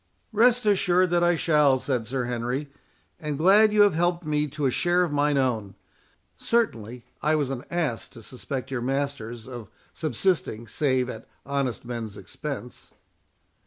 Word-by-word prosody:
"Rest 240 Hz, +2 st, +4 dB
assured 185 Hz, -3 st, +3 dB
that 175 Hz, 0 st, +3 dB
I 175 Hz, 0 st, +4 dB
shall," 150 Hz, -4 st, +3 dB
said 125 Hz, -4 st, -2 dB
Sir 130 Hz, +1 st, -2 dB
Henry; 125 Hz, +4 st, -3 dB, 0.5 s
"and 150 Hz, -2 st, -3 dB
glad 200 Hz, +7 st, +6 dB
you 210 Hz, -1 st, +6 dB
have 205 Hz, -3 st, +4 dB
helped 175 Hz, +1 st, 0 dB
me 150 Hz, 0 st, 0 dB
to 145 Hz, 0 st, -3 dB
a 130 Hz, -, +3 dB
share 175 Hz, +6 st, +2 dB
of 170 Hz, -, -2 dB
mine 145 Hz, 0 st, +2 dB
own. 115 Hz, -7 st, -1 dB, 0.6 s
Certainly 125 Hz, -, -1 dB, 0.2 s
I 155 Hz, +1 st, +2 dB
was 145 Hz, -3 st, 0 dB
an 130 Hz, -1 st, -4 dB
ass 155 Hz, -10 st, -1 dB
to 115 Hz, -, -14 dB
suspect 130 Hz, +3 st, -6 dB
your 125 Hz, -3 st, -2 dB
masters 125 Hz, -4 st, -3 dB
of 120 Hz, -6 st, -8 dB, 0.2 s
subsisting, 140 Hz, -, -1 dB
save 130 Hz, +1 st, +1 dB
at 110 Hz, -3 st, -8 dB, 0.2 s
honest 140 Hz, -4 st, -2 dB
men's 115 Hz, -4 st, -5 dB
expense." 135 Hz, -2 st, -7 dB
140 Hz, 160 wpm, -25 LUFS, 125-175 Hz, 0.6 s, glad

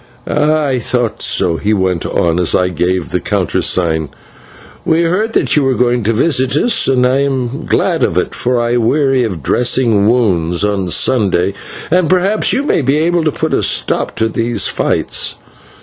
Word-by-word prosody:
"Ah, 150 Hz, +1 st, +1 dB
I 130 Hz, -3 st, 0 dB
thought 120 Hz, -1 st, -2 dB
so," 85 Hz, -2 st, +1 dB
he 105 Hz, +4 st, 0 dB
went 95 Hz, -3 st, -1 dB
on 85 Hz, 0 st, 0 dB
as 90 Hz, -, +2 dB
I 90 Hz, 0 st, +1 dB
gave 90 Hz, -2 st, -2 dB
the -, -, 0 dB
countersign; 80 Hz, -4 st, -1 dB, 0.7 s
"we 165 Hz, +1 st, +1 dB
heard 205 Hz, +7 st, -1 dB
that -, -, +1 dB
you 150 Hz, -, +2 dB
were 135 Hz, -1 st, +1 dB
going 125 Hz, 0 st, +1 dB
to 115 Hz, -, +2 dB
visit 130 Hz, +1 st, +1 dB
us, 230 Hz, +7 st, +2 dB
and 125 Hz, -2 st, +2 dB
I 130 Hz, +2 st, +2 dB
am 135 Hz, -2 st, -2 dB
glad -, -, 0 dB
of -, -, 0 dB
it, -, -, -1 dB
for 125 Hz, 0 st, -1 dB
I 120 Hz, +1 st, 0 dB
weary 135 Hz, +2 st, +1 dB
of 90 Hz, -, -4 dB
dressing 115 Hz, -, +2 dB
wounds 90 Hz, -8 st, 0 dB
on 100 Hz, -3 st, -1 dB
Sundays, 95 Hz, -2 st, 0 dB, 0.4 s
and 180 Hz, -1 st, +2 dB
perhaps 185 Hz, +4 st, +1 dB
you 270 Hz, -, 0 dB
may 290 Hz, -, +1 dB
be 135 Hz, +2 st, +1 dB
able 170 Hz, +2 st, +1 dB
to 155 Hz, -, +2 dB
put -, -, -3 dB
a -, -, +1 dB
stop -, -, -1 dB
to 110 Hz, -, 0 dB
these 115 Hz, +1 st, -1 dB
fights. -, -, -1 dB
120 Hz, 180 wpm, -14 LUFS, 95-145 Hz, 0.7 s, as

